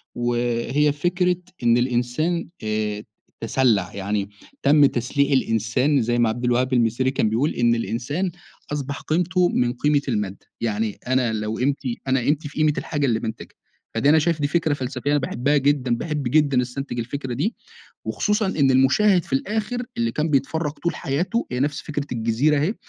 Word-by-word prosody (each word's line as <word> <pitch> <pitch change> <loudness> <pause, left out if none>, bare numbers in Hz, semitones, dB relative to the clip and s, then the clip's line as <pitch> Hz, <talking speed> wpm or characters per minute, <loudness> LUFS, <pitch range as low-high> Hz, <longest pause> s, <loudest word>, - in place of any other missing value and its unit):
وهي 120 +4 +1
فكرة 180 +4 +1 0.3
إن 120 0 +4
الإنسان 125 +7 0 0.2
آآ، 105 -1 -2 0.4
تسلع، 115 -5 +1
يعني 100 0 -2 0.3
تم 145 +1 +6
تسليع 140 +3 +1
الإنسان 125 +3 +2
زي 120 +1 0
ما 120 -1 +3
عبد 120 +3 -3
الوهاب 125 +2 +1
المسيري 120 +2 +2
كان 110 - +1
بيقول، 120 +8 +1
إن 120 -1 +2
الإنسان 130 +11 -2 0.4
أصبح 140 -1 -4
قيمته 180 +2 +1
من 125 0 +1
قيمة 145 +3 +2
المادة، 105 -5 -3 0.2
يعني 110 -1 -1
أنا 125 -3 +1
لو 110 0 -3
قيمتي 130 -2 -1
أنا 130 0 +2
قيمتي 145 +4 0
في - - -14
قيمة 155 -1 +3
الحاجة 145 -2 -1
اللي 115 -4 +1
بانتجها. 110 -1 -6 0.4
فدي 115 +5 +2
أنا 160 +1 +6
شايف 160 0 0
دي 145 - +2
فكرة 155 -1 +1
فلسفية 135 +1 -3
أنا 145 - +3
باحبها 140 +2 0
جدًا 135 -3 +2
باحب 150 +2 -3
جدًا 140 0 +3
أستنتج 125 0 -4
الفكرة 130 +2 -4
دي، 165 - -1 0.5
وخصوصًا 210 0 0
إن 140 -8 +2
المُشاهد 165 +8 +4
في - - -8
الآخر 220 - -1
اللي 115 0 0
كان 155 +5 -1
بيتفرج 150 +2 0
طول 170 +3 -3
حياته 175 - -1
هي 125 - -2
نفس 145 +2 -1
فكرة 145 -2 -4
الجزيرة 120 +6 +1
أهي، 175 +10 0
135 Hz, 170 wpm, -23 LUFS, 120-150 Hz, 0.5 s, تم